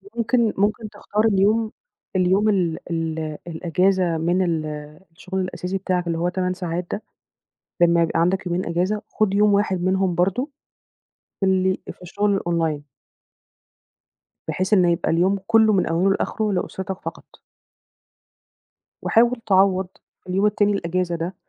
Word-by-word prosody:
ممكن 235 -1 +1
ممكن 210 +2 0
تختار 210 +1 -2
اليوم، 215 +2 +2 0.4
اليوم 190 +3 +3
ال 175 -5 +1
ال 160 -2 -3
الأجازة 175 +1 +1
من 175 +3 +1
ال 165 -4 0 0.5
الشُغل 185 +3 -5
الأساسي 185 +1 -3
بتاعك 185 -2 -1
اللي 165 -1 -1
هو 175 +2 0
8 180 0 -1
ساعات 180 -1 -4
ده، - - -3 0.8
لمّا 170 0 +5
يبقى 165 0 0
عندك 185 +3 +1
يومين 175 +1 -1
أجازة 180 +5 -1
خُد 215 -3 0
يوم 210 +1 +4
واحد 200 -3 +1
منهم 185 0 +1
برضه 195 - 0 1.0
اللي 190 0 +2
في - - -18
الشُغل 200 +3 0
الOnline 165 -4 -1 1.6
بحيث 185 +3 -1
إنه 180 -4 +5
يبقى 170 - -1
اليوم 185 +4 +2
كلّه 220 -1 +5
من 190 - +2
أوله 170 +4 +1
لآخره 210 +1 -1
لأُسرتك 190 +1 -4
فقط. - - -7 1.8
وحاول 235 +1 +3
تعوّض 190 -1 +3 0.4
في - - -14
اليوم 190 +3 +1
التاني 205 0 +2
الأجازة 180 -2 -1
ده، 170 +3 -4
185 Hz, 135 wpm, -22 LUFS, 175-205 Hz, 1.8 s, لمّا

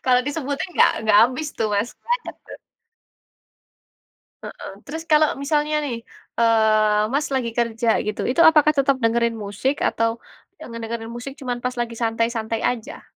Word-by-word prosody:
Kalau 250 -1 +4
disebutin, 285 +3 -3
nggak - - +6
nggak 210 -1 +5
habis 295 +4 -4
tuh 225 - 0
Mas. 205 +4 0
Banyak 485 +1 -2
tuh. - - -10 1.9
Heeh, - - -8
terus 320 +3 -6
kalau 305 0 +6
misalnya 295 +1 0
nih, 250 -5 -3 0.4
eee, 215 -2 +3
Mas 295 +2 0
lagi 235 -3 -1
kerja 235 -1 0
gitu, 210 0 -3
itu 260 +7 +2
apakah 305 -1 +6
tetap 275 -1 +2
dengerin 235 0 +1
musik 215 +7 -2
atau 230 0 0 0.4
yang - - -10
ngedengerin 230 0 -6
musik 240 +3 -7
cuman 245 -2 -4
pas 250 0 -2
lagi 235 -1 -3
santai-santai 225 -1 -1
aja? 240 -3 -3
235 Hz, 150 wpm, -22 LUFS, 225-280 Hz, 1.9 s, nggak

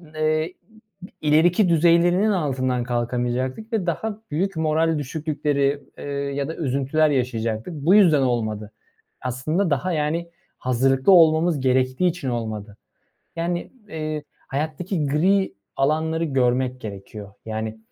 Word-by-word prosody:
eee, 155 0 +1
i - - -29 0.7
ileriki 170 +6 +4
düzeylerinin 175 +5 +4
altından 130 -8 0
kalkamayacaktık 125 - -2
ve 210 -5 0
daha 205 +5 -3
büyük 190 +5 -1
moral 160 0 +1
düşüklükleri, 145 -1 -1
eee, - - -8 0.3
ya 140 -1 -2
da 160 - -5
üzüntüler 140 +2 +1
yaşayacaktık. 120 -1 -1
Bu 155 +5 +3
yüzden 170 -9 +6
olmadı. 110 -4 -1 0.5
Aslında 155 +9 -1
daha, 150 +5 0
yani, 160 +2 -1 0.3
hazırlıklı 130 +5 +2
olmamız 165 -2 +5
gerektiği 130 +5 +2
için 170 -6 -2
olmadı. 110 -3 -4 0.6
Yani, 175 +1 -2 0.2
eee, 155 -2 -4 0.2
hayattaki 155 +4 -2
gri 190 +7 +2 0.2
alanları 160 +4 +1
görmek 130 -2 0
gerekiyor. 100 -1 -8
Yani, 110 0 -4
150 Hz, 115 wpm, -23 LUFS, 125-165 Hz, 0.7 s, yüzden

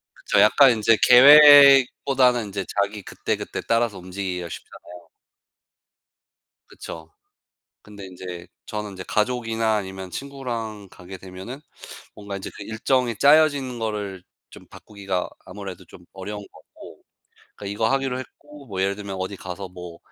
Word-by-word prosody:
그쵸. 105 - 0
약간 130 +5 +6
인제 110 0 +2
계획보다는 135 -2 +7
인제 100 -1 -5 0.2
자기 100 +1 -3
그때그때 - - -5
따라서 115 -3 0
움직이기가 90 -1 -5
쉽잖아요. 90 +1 -12 1.6
그쵸. 80 0 -11 0.7
근데 100 -2 -12
인제 90 -1 -9 0.2
저는 105 -1 -6
이제 95 -1 -8
가족이나 115 -1 -1
아니면 95 -2 -6
친구랑 115 -7 -6
가게 95 +2 -11
되면은 95 +8 -10 0.6
뭔가 100 -1 -8
이제 95 - -7
그 100 - -9
일정이 120 +2 -1
짜여지는 140 -2 +3
거를 105 -4 -5 0.3
좀 - - -15
바꾸기가 100 -3 -5 0.2
아무래도 95 -2 -9
좀 85 +1 -17
어려운 105 +2 -7
거고. - - -16 0.6
그러니까 100 - -9
이거 110 +2 0
하기로 135 -2 -1
했고 145 +2 -13
뭐 95 -3 -5
예를 100 +1 -1
들면 100 -2 -7
"어디 95 +1 -4
가서 95 +1 -8
뭐 90 -2 -11
105 Hz, 315 characters per minute, -22 LUFS, 95-125 Hz, 1.6 s, 계획보다는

